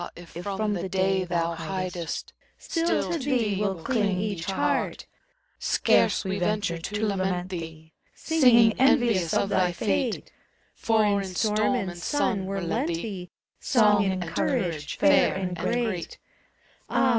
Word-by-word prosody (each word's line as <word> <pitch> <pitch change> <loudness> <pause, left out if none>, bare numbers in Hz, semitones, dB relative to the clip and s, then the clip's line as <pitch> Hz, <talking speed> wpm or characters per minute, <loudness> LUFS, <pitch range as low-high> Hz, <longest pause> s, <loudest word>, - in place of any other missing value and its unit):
if 175 -1 -12
from 200 +4 -2
the 185 -1 -3
Day 190 0 +1
thou 170 -1 -1
faidest, 175 0 -4 0.2
Still 330 0 -1
to 335 - -1
thee 245 -7 0
will 190 -5 -2
ding 210 -7 0
each 195 -4 -3
heart. 190 0 -1 0.5
Scarce - - +2
we 190 +1 -2
venture 200 -3 -1
to 210 +6 -3
lament 185 -3 -1
thee. 160 -3 -8 0.2
Singing, 245 -8 +4
envious 235 - +3
of 200 - +1
thy 185 -3 +2
fate; 95 - -1 0.4
For 220 -1 +1
in 200 -1 +2
storm 210 +5 +1
and 190 -7 -3
sun 200 0 -1
were 195 0 -3
lent 170 -2 -1
thee 180 +1 -4 0.3
Song 210 -4 +3
and 190 -2 -1
courage, 160 -2 -2
fair 290 -2 +4
and 185 -2 -3
great. 190 0 -2 0.7
Ah! 265 - +2
195 Hz, 135 wpm, -26 LUFS, 175-215 Hz, 0.7 s, Singing